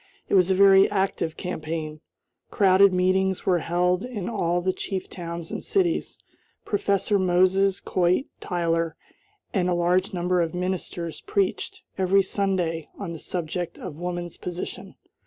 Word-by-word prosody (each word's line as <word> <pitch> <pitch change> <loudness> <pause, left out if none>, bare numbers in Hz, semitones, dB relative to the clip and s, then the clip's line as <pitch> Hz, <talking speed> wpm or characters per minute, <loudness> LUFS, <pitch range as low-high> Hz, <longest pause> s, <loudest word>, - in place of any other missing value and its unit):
It - - -2
was 185 -2 +5
a 190 - +3
very 195 0 +7
active 190 -5 -1
campaign. 155 -3 -4 0.5
Crowded 195 0 +5
meetings 185 +1 +1
were 180 -2 +3
held 180 +2 +1
in 230 -7 -5
all 175 -6 0
the 185 +1 0
chief 190 0 -4
towns 170 -2 -6
and - - -4
cities. 360 -4 0 0.5
Professor 200 0 +1
Moses 185 +1 +3
Coit 180 +8 +1
Tyler, 165 -2 -1 0.6
and 180 -3 +1
a 180 - +2
large 180 +2 +2
number 180 0 +1
of 165 0 -2
ministers 180 -3 -3
preached, 200 -2 -1 0.2
every 190 +1 +4
Sunday, 185 -5 -1
on 185 -5 -5
the 165 - -7
subject 175 +1 -4
of 165 -4 -8
woman's 175 -1 -4
position. 175 0 -6
180 Hz, 140 wpm, -25 LUFS, 170-190 Hz, 0.6 s, very